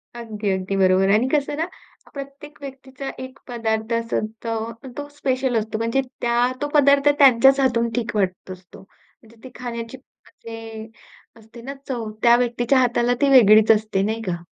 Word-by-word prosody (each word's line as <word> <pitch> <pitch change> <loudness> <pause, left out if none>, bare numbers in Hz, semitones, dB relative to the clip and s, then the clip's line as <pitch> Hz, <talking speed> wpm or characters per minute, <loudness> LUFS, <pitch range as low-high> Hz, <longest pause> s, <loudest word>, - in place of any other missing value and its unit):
अगदी, 215 -3 -5
अगदी 190 +1 -2
बरोबर. 190 0 +3
आणि 225 +5 +2
कसं 290 -1 0
ना 320 - 0 0.5
प्रत्येक 280 +1 -10
व्यक्तीचा 270 0 -8
एक 260 +1 -11
पदार्थ 225 -2 -2
असतो, 225 0 -3 0.3
तो 290 0 -5
स्पेशल 260 -3 -1
असतो. 220 0 -3
म्हणजे 230 +4 0 0.2
त्या 240 +1 +1
तो 290 - -1
पदार्थ 280 -1 +4
त्यांच्याच 270 0 +6
हातून 235 -3 +1
ठीक 235 -2 -3
वाटत 190 -2 -2
असतो. 180 -1 -13
म्हणजे 225 +3 -24
ती 260 - -9
खाण्याची 235 0 -6
म्हणजे 225 -3 -11 0.5
असते 225 +2 -15
ना 275 +3 -7
चव, 235 -5 -4
त्या 235 0 +6
व्यक्तीच्या 240 +2 +1
हाताला 245 -1 +2
ती 285 - +3
वेगळीच 220 -4 +6
असते 215 -3 +1
नाही 220 +2 -2
का? 180 -5 -4
235 Hz, 155 wpm, -21 LUFS, 220-265 Hz, 0.5 s, त्यांच्याच